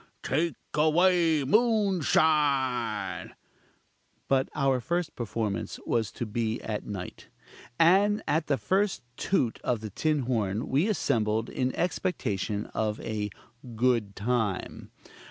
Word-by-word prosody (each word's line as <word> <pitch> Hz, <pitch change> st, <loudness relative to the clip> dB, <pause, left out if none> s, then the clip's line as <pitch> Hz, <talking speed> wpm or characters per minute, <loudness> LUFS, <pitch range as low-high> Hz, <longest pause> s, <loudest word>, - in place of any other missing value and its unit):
take 160 Hz, +5 st, 0 dB, 0.2 s
away 165 Hz, 0 st, +3 dB
moonshine!" 155 Hz, -, +1 dB, 0.9 s
But 135 Hz, 0 st, +2 dB
our 135 Hz, -3 st, +2 dB
first 170 Hz, +3 st, -2 dB
performance 110 Hz, -3 st, -3 dB
was 110 Hz, -5 st, 0 dB
to 120 Hz, -, -4 dB
be 115 Hz, +1 st, -2 dB
at 105 Hz, -2 st, -3 dB
night: 95 Hz, -3 st, -7 dB, 0.5 s
and 200 Hz, +5 st, +4 dB
at 155 Hz, +1 st, +1 dB
the 140 Hz, -, +2 dB
first 195 Hz, +1 st, 0 dB
toot 125 Hz, -10 st, 0 dB
of 120 Hz, -3 st, 0 dB
the 110 Hz, -2 st, -6 dB
tin 155 Hz, +6 st, 0 dB
horn 110 Hz, -4 st, -1 dB
we 145 Hz, +9 st, +2 dB
assembled 115 Hz, -, 0 dB
in 130 Hz, 0 st, 0 dB
expectation 110 Hz, -, -1 dB
of 110 Hz, -1 st, -1 dB
a 105 Hz, -2 st, -3 dB, 0.5 s
"good 115 Hz, -4 st, +1 dB
time." 110 Hz, -3 st, -2 dB
130 Hz, 115 wpm, -28 LUFS, 110-165 Hz, 0.9 s, and